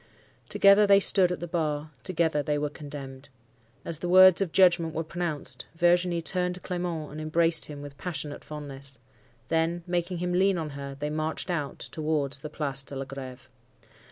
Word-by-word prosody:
"Together 200 +1 +6
they 200 0 +7
stood 190 -2 +5
at 180 - -3
the 175 - -4
bar; 155 -3 -2
together 165 -5 0
they 145 +1 -1
were 145 0 -2
condemned. 140 -2 -9 0.6
As 160 -2 -2
the 175 - -3
words 185 0 +8
of 185 -4 0
judgment 175 -3 +4
were 165 - -1
pronounced, 165 -2 -4
Virginie 175 0 +2
tuned 180 0 -1
to - - -9
Clement, 175 -4 -4
and 155 +1 -7
embraced 165 +1 +2
him 145 -1 -8
with 140 -1 -11
passionate 155 -5 -4
fondness. 140 -3 -7 0.5
Then, 165 +1 0
making 175 0 -2
him 180 +1 -2
lean 190 +1 +3
on 155 -3 -4
her, 140 0 -7
they 150 +1 -3
marched 155 +3 -2
out 150 -5 -3
towards 150 -3 -2
the 155 - -7
Place 140 -3 -2
de 135 +1 -9
la 135 0 -4
Greve. 130 -1 -9
160 Hz, 180 wpm, -27 LUFS, 145-175 Hz, 0.6 s, words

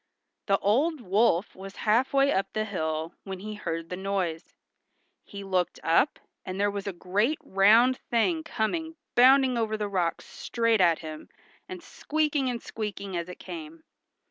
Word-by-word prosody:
The 195 -1 +4
old 280 +12 +1
wolf 200 -3 +1
was 195 +1 -10
half 230 +5 +3
way 275 0 +3
up 195 - -1
the 215 0 -1
hill 160 -4 -3
when 190 -1 -6
he 215 +1 -6
heard 165 -5 -5
the 180 - -3
noise. 185 -4 -3 0.7
He 200 -1 -9
looked 185 -2 -1
up, 170 - +3 0.3
and 185 +1 -6
there 205 0 +2
was 200 0 -5
a - - -1
great 205 - 0
round 225 +7 +4
thing 315 +8 +2
coming 320 +5 -2 0.2
bounding 255 0 +5
over 220 -1 -1
the 210 -1 -2
rocks 180 -4 -1
straight 230 -3 0
at 170 -3 +4
him, 155 0 -8 0.4
and 365 -2 -8
squeaking 300 -5 -1
and 240 -2 -4
squeaking 200 -3 -5
as 170 +1 -3
it 180 - -8
came. 165 -3 -9
205 Hz, 165 wpm, -27 LUFS, 180-245 Hz, 0.7 s, bounding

